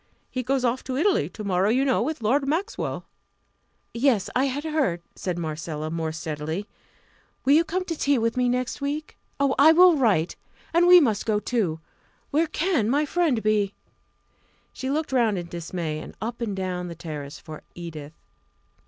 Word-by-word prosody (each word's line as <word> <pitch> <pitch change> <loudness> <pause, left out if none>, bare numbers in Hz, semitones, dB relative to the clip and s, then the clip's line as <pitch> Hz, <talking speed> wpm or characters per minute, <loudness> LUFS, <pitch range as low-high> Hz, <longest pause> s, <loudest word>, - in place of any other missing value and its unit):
He 255 - -2
goes 260 +1 0
off 245 +2 0
to 260 -1 -3
Italy 380 +6 +2
to 215 - -8
morrow, 195 0 +1
you 260 +4 +2
know, 260 -4 +2
with 280 0 -3
Lord 270 +6 +2
Maxwell." 385 - -2 0.9
"Yes, 235 -5 +2
I 260 +2 +3
had 280 +2 -2
heard," 285 - 0
said 180 -2 -3
Marcella, 155 -1 -4
more 160 -1 -2
steadily. 160 +4 -4 0.8
"Will 275 - +5
you 320 +3 +6
come 365 +2 -2
to 335 - -3
tea 285 -2 +2
with 230 0 0
me 250 -1 +2
next 250 +2 -2
week? 295 +2 -3 0.2
Oh, 280 -1 +3
I 310 +3 +8
will 355 -1 +7
write. 200 - +2 0.4
And 345 +1 +5
we 360 0 +10
must 225 - +1
go 210 -2 +2
too 195 -9 -1 0.5
where 315 +3 +2
can 310 - 0
my 290 +4 +2
friend 300 -7 +1
be?" 210 -2 +1 1.0
She 260 - -4
looked 305 +2 -1
round 230 -6 +2
in 175 - -4
dismay, 170 -2 -4
and - - -10
up 235 +2 -5
and 210 -4 -2
down 180 -2 -3
the 170 - -7
terrace 150 -3 -7
for 155 -1 -10
Edith. 155 -3 -8
235 Hz, 180 wpm, -25 LUFS, 175-285 Hz, 1.0 s, we